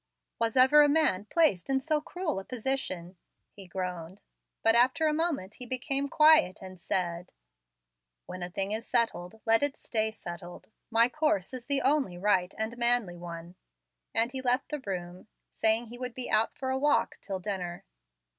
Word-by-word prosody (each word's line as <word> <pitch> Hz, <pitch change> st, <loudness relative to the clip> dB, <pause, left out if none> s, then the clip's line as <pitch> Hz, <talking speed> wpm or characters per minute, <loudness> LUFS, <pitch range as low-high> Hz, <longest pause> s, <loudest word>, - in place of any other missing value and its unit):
"Was 230 Hz, +1 st, 0 dB
ever 265 Hz, +4 st, +7 dB
a 290 Hz, -, +4 dB
man 285 Hz, -11 st, +2 dB
placed 280 Hz, -, +1 dB
in 270 Hz, 0 st, +2 dB
so 300 Hz, +2 st, -1 dB
cruel 330 Hz, -, -4 dB
a -, -, -8 dB
position?" 215 Hz, -8 st, -3 dB, 0.3 s
he 195 Hz, -2 st, -13 dB
groaned. 180 Hz, 0 st, -6 dB, 0.4 s
But 225 Hz, -, +6 dB
after 255 Hz, +7 st, +3 dB
a 305 Hz, -, +2 dB
moment 300 Hz, -, -2 dB
he 250 Hz, -, -6 dB
became 275 Hz, +2 st, -1 dB
quiet 305 Hz, -, +5 dB
and 185 Hz, -1 st, -11 dB
said, 175 Hz, -1 st, -2 dB, 0.9 s
"When 185 Hz, -, -8 dB
a 175 Hz, -, -4 dB
thing 195 Hz, +2 st, -3 dB
is 220 Hz, +2 st, -4 dB
settled, 220 Hz, -3 st, +1 dB
let 225 Hz, 0 st, +6 dB
it 285 Hz, 0 st, 0 dB
stay 220 Hz, -2 st, 0 dB
settled; 175 Hz, -4 st, -10 dB, 0.2 s
my 230 Hz, 0 st, +5 dB
course 255 Hz, -, -1 dB
is 250 Hz, -2 st, -7 dB
the 280 Hz, -1 st, +1 dB
only 270 Hz, -10 st, +1 dB
right 185 Hz, -1 st, +1 dB
and 220 Hz, +2 st, -3 dB
manly 235 Hz, -6 st, +3 dB
one"; 170 Hz, 0 st, -9 dB, 0.6 s
and 230 Hz, +2 st, +1 dB
he 260 Hz, 0 st, -5 dB
left 255 Hz, +1 st, 0 dB
the 300 Hz, -, -4 dB
room 180 Hz, -1 st, -6 dB, 0.3 s
saying 220 Hz, +2 st, +3 dB
he 245 Hz, +1 st, -9 dB
would 250 Hz, -2 st, -5 dB
be 255 Hz, -, -3 dB
out 215 Hz, +1 st, +1 dB
for 260 Hz, -1 st, -3 dB
a 265 Hz, -, -1 dB
walk 290 Hz, +1 st, +1 dB
till 195 Hz, -2 st, -5 dB
dinner. 180 Hz, -3 st, -5 dB
225 Hz, 175 wpm, -28 LUFS, 185-265 Hz, 0.9 s, ever